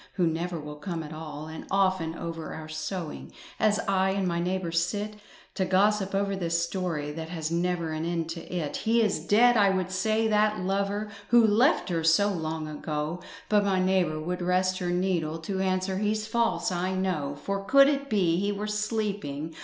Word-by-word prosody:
Who 180 - +1
never 170 +1 -2
will 150 0 -8
come 165 +2 -4
at 155 +1 -8
all. 155 -1 -7
And 160 0 -8
often 185 -4 +1
over 165 -1 -5
our 155 -1 -7
sewing, 155 +2 -5 0.3
As 210 -1 +3
I 190 -1 +2
and 190 -1 0
my 170 -1 0
neighbour 180 0 -1
sit 205 +5 -1 0.4
To 190 - 0
gossip 195 +1 +2
over 200 0 0
this 170 -3 0
story 170 -5 -3
That 160 +1 -6
has 160 -2 -3
never 170 -1 0
an 155 0 -3
end 165 -1 -1
to 165 0 -5
it, 170 -5 -2
"He 230 +1 +2
is 210 -7 +1
dead," 230 +9 +4
I 200 -2 +5
would 185 -1 -1
say, 215 +4 +1
"that 215 0 +2
lover, 200 +3 -1 0.2
Who 240 -1 +6
left 225 - +3
her 165 -2 -1
so 165 +6 +4
long 160 -3 -3
ago," 150 +2 -4 0.3
But 210 -1 +3
my 195 -2 +1
neighbour 185 -4 +1
would 180 +3 -3
rest 185 +1 +1
her 180 -2 -2
needle 175 -3 0
To 190 +4 -4
answer, 185 0 0
"He's 215 +1 0
false 230 -2 0
I 185 +1 -1
know." 155 -7 -1
"For 200 0 -2
could 275 +6 +6
it 280 -1 0
be 180 -6 +2
he 200 +1 0
were 205 +1 -3
sleeping. 210 -8 -2
185 Hz, 190 wpm, -27 LUFS, 165-205 Hz, 0.4 s, Who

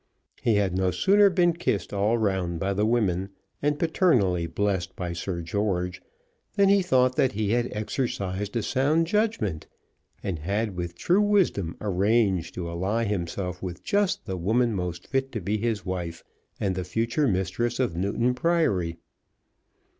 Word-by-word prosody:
He 115 - +2
had 100 -3 +1
no 95 0 +2
sooner 200 - +4
been 175 -2 +3
kissed 105 - -2
all 105 +4 +2
round 95 -6 -1
by 100 +2 0
the 105 +2 +1
women, 100 -5 +1 0.3
and 145 0 +1
paternally 120 - +2
blessed 95 +1 -1
by 90 -2 -4
Sir 85 +1 -4
George, 90 -1 -1 0.5
than 200 -1 +4
he 200 0 +5
thought 130 -7 +3
that 130 - +3
he 105 0 -1
had 120 +1 +1
exercised 105 -3 -3
a 115 - 0
sound 145 +8 +2
judgment, 165 - -1 0.6
and 90 -5 -3
had 100 +5 -2
with 85 -1 -4
true 180 - +2
wisdom 190 - +2
arranged 100 -2 +1
to 90 -2 -4
ally 95 +7 -1
himself 90 -3 -3
with 90 -2 -6
just 200 -2 0
the 95 -4 -3
woman 115 +6 +1
most 90 -3 -4
fit 135 0 -1
to 110 - -2
be 105 +3 -1
his 110 -4 -1
wife, 85 -3 -4 0.4
and 95 -2 0
the 90 0 -3
future 115 - 0
mistress 105 +5 -1
of 125 -10 0
Newton 100 +7 0
Priory. 115 - +1
100 Hz, 160 wpm, -26 LUFS, 90-125 Hz, 0.6 s, he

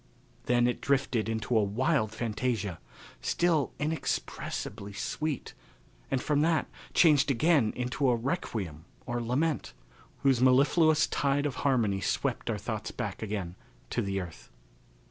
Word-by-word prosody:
Then 120 0 +4
it 125 - 0
drifted 130 -5 +1
into 110 +1 -1
a 110 - +5
wild 110 +3 +1
fantasia, 110 -5 -2 0.4
still 165 -5 +1
inexpressibly 115 -8 -3
sweet, 155 +7 -3 0.6
and 135 - +1
from 145 +2 +1
that 160 0 +2 0.3
changed 150 -4 +5
again 140 -3 +3
into 125 +2 0
a 120 - +4
requiem 110 - -3 0.2
or 120 -1 -2
lament, 130 +3 -1 0.5
whose 135 -3 +4
mellifluous 150 +4 +5
tide 140 0 0
of 140 -3 -2
harmony 115 -8 +1
swept - - -1
our - - 0
thoughts - - -4
back - - -5
again 100 -5 -3 0.4
to - - 0
the 100 -1 -1
earth. 85 -10 -8
125 Hz, 130 wpm, -29 LUFS, 110-145 Hz, 0.6 s, a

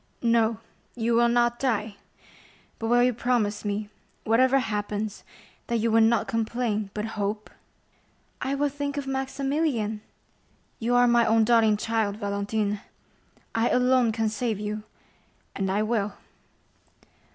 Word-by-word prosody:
"No, 230 -1 +3 0.4
you 235 -1 0
will 235 +1 +4
not 240 0 +2
die; 220 -5 -1 0.8
but 225 - -3
will 240 +1 +4
you 250 0 +3
promise 230 -3 0
me, 205 0 -2 0.4
whatever 255 +4 +4
happens, 210 -3 -3 0.4
that 235 - 0
you 230 0 0
will 225 +1 +5
not 225 +1 +3
complain, 225 -2 -1
but 210 0 -2 0.2
hope?" 210 +1 -3 0.9
"I 270 +1 -1
will 290 +1 +1
think 285 0 -4
of 285 - -2
Maximilian!" 270 -4 -1 0.8
"You 240 +2 +1
are 245 0 +6
my 235 -1 +4
own 225 0 +4
darling 220 -2 +4
child, 220 -2 -1
Valentine! 205 0 -2 0.7
I 225 +1 +2
alone 250 -1 +3
can 225 0 0
save 220 -1 -2
you, 210 +1 -4 0.7
and 195 -1 -1
I 205 +3 +1
will." 215 -2 -1
225 Hz, 135 wpm, -26 LUFS, 210-245 Hz, 0.9 s, are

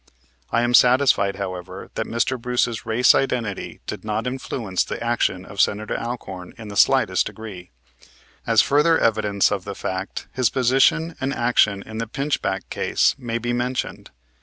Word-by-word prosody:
I 120 - +1
am 120 0 0
satisfied, 125 -6 +4
however, 95 -3 -6
that - - -3
Mr. 115 +2 -1
Bruce's 125 -2 -1
race 120 +3 +5
identity 120 -7 -2
did 105 - -6
not 110 +1 -2
influence 125 -6 -2
the - - -5
action 115 -6 0
of 100 0 -2
Senator 105 +1 0
Alcorn 95 -7 -6
in 110 -2 -9
the 100 - -8
slightest - - +3
degree. 95 -6 -9 0.8
As - - +5
further 150 +4 +3
evidence 105 -3 +2
of 100 -3 -2
that 100 -1 -6
fact, 95 +1 -4
his 130 -4 +2
position 135 +6 +2
and 135 +2 -1
action 110 -4 +2
in 110 0 -7
the 115 - -3
Pinchback 115 -7 -2
case - - +2
may 115 -3 -3
be 120 +1 -2
mentioned. 125 +1 -3
115 Hz, 160 wpm, -22 LUFS, 100-125 Hz, 0.8 s, race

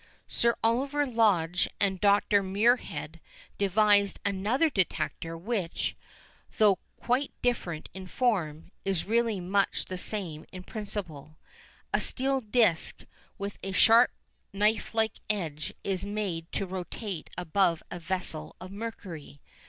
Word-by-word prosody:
Sir 235 0 +2
Oliver 275 +6 +2
Lodge 200 -8 +2
and 190 -2 +1
Dr 205 0 +4
Muirhead 190 - +1 0.4
devised 200 0 +4
another 205 +10 +2
detector 165 - -1
which, 190 -2 -2 0.6
though 205 -3 +5 0.2
quite 255 +4 +1
different 180 -10 -1
in 190 -1 -8
form, 180 -9 0
is 195 -4 0
really 230 -1 +1
much 195 +3 +1
the 185 -1 -5
same 180 -7 -2
in 185 -1 -8
principle. 175 -9 -6 0.6
A - - +3
steel 270 0 +1
disc 215 -6 +1 0.3
with 200 -1 -5
a 195 - -4
sharp 230 +5 +7 0.4
knife 210 +3 +1
like 220 -1 +1
edge 160 -8 -2
is 190 -2 -1
made 200 -5 -3
to 195 - 0
rotate 185 0 -5
above 180 -1 +1
a 175 - -5
vessel 175 - -2
of 185 +1 -9
mercury. 195 -9 -7
200 Hz, 120 wpm, -29 LUFS, 175-220 Hz, 0.6 s, sharp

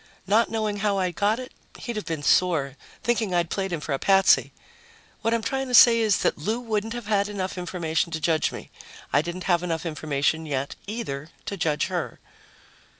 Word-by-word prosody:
Not 215 +4 +3
knowing 215 -2 -1
how 205 -1 0
I 185 -2 0
got 205 +5 +1
it, 255 0 -8 0.3
he'd 235 - -5
have 215 - -5
been 160 -3 -3
sore, 145 -6 +2 0.3
thinking 230 -6 0
I'd 170 -1 0
played 195 -1 -2
him 170 - -2
for 150 -1 -4
a 135 - -1
patsy. 195 -1 +4 0.7
What 225 - 0
I'm 230 -1 0
trying 270 +3 -2
to 250 - +1
say 235 -1 +8
is 215 -3 +2
that - - +1
Lou 215 +10 -1
wouldn't 225 -2 -2
have 240 -2 -6
had 205 -1 +1
enough 190 -2 -4
information 175 -2 -2
to 160 - -2
judge 160 0 +1
me. - - -9 0.4
I 145 - +5
didn't 175 +3 -6
have 175 -3 +2
enough 165 -2 -3
information 155 0 -1
yet, 140 -1 -3
either, 165 -10 -5 0.2
to 200 - -4
judge 155 -5 0
her. - - -4
190 Hz, 200 wpm, -25 LUFS, 160-220 Hz, 0.7 s, say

